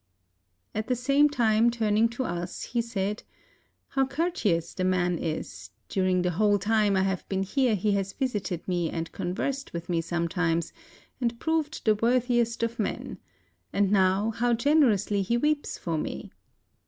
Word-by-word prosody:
At 215 Hz, +1 st, -3 dB
the 255 Hz, -, +1 dB
same 275 Hz, +4 st, +3 dB
time 230 Hz, -4 st, +3 dB
turning 225 Hz, -1 st, +2 dB
to 240 Hz, +3 st, -3 dB
us 175 Hz, -3 st, -4 dB
he 240 Hz, 0 st, -1 dB
said, 210 Hz, -2 st, -3 dB, 0.7 s
''How 270 Hz, -1 st, +2 dB
courteous 270 Hz, -, 0 dB
the 185 Hz, -, -3 dB
man 180 Hz, -2 st, +1 dB
is; 155 Hz, -1 st, -5 dB, 0.2 s
dur 190 Hz, -1 st, 0 dB
ing 185 Hz, -1 st, +2 dB
the 180 Hz, -, +1 dB
whole 205 Hz, +3 st, +3 dB
time 210 Hz, 0 st, +2 dB
I 190 Hz, -, +3 dB
have 190 Hz, -1 st, -2 dB
been 190 Hz, 0 st, 0 dB
here 245 Hz, +3 st, +1 dB
he 205 Hz, +2 st, 0 dB
has 195 Hz, -1 st, 0 dB
visited 205 Hz, -, -3 dB
me 175 Hz, -3 st, 0 dB
and 165 Hz, 0 st, -4 dB
conversed 265 Hz, +10 st, -3 dB
with 170 Hz, +1 st, -6 dB
me 170 Hz, -2 st, +1 dB
sometimes, 170 Hz, 0 st, -1 dB, 0.5 s
and 235 Hz, -1 st, -1 dB
proved 320 Hz, -1 st, -1 dB
the 215 Hz, -, +5 dB
wor 235 Hz, +4 st, +3 dB
thiest 240 Hz, -2 st, 0 dB
of 230 Hz, 0 st, -2 dB
men; 210 Hz, -, -3 dB, 0.5 s
and 200 Hz, -1 st, +1 dB
now 195 Hz, +2 st, +3 dB
how 235 Hz, +2 st, +1 dB
generously 235 Hz, -7 st, +3 dB
he 235 Hz, +5 st, +1 dB
weeps 295 Hz, +3 st, 0 dB
for 165 Hz, -3 st, -2 dB
me. -, -, -5 dB
210 Hz, 165 wpm, -27 LUFS, 185-240 Hz, 0.7 s, the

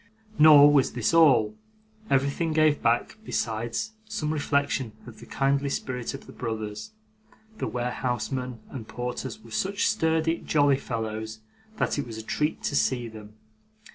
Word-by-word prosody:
Nor 145 Hz, -1 st, +9 dB
was 140 Hz, -3 st, +3 dB
this 120 Hz, +5 st, 0 dB
all. 135 Hz, -10 st, +5 dB, 0.6 s
Everything 140 Hz, +4 st, +1 dB
gave 155 Hz, -1 st, +3 dB
back, 120 Hz, -, +1 dB
besides, 115 Hz, -, -2 dB
some 160 Hz, -9 st, -2 dB
reflection 140 Hz, -5 st, 0 dB
of 110 Hz, -3 st, -12 dB
the 120 Hz, -, -12 dB
kindly 140 Hz, +1 st, +1 dB
spirit 125 Hz, -2 st, -3 dB
of 135 Hz, -, -11 dB
the -, -, -12 dB
brothers. 110 Hz, -, -5 dB, 0.7 s
The -, -, -1 dB
warehousemen 125 Hz, 0 st, -3 dB
and 115 Hz, -5 st, -7 dB
porters 125 Hz, 0 st, -5 dB
were 115 Hz, -, -14 dB
such 195 Hz, -, 0 dB
sturdy, 160 Hz, -4 st, +1 dB
jolly 145 Hz, -3 st, +3 dB
fellows, 110 Hz, -3 st, -5 dB, 0.4 s
that 150 Hz, -, 0 dB
it 140 Hz, -, -3 dB
was 115 Hz, -2 st, -7 dB
a 110 Hz, -, -6 dB
treat 150 Hz, +7 st, -2 dB
to 145 Hz, -, -1 dB
see 125 Hz, -4 st, +1 dB
them. 105 Hz, -1 st, -12 dB
130 Hz, 145 wpm, -26 LUFS, 115-150 Hz, 0.7 s, Nor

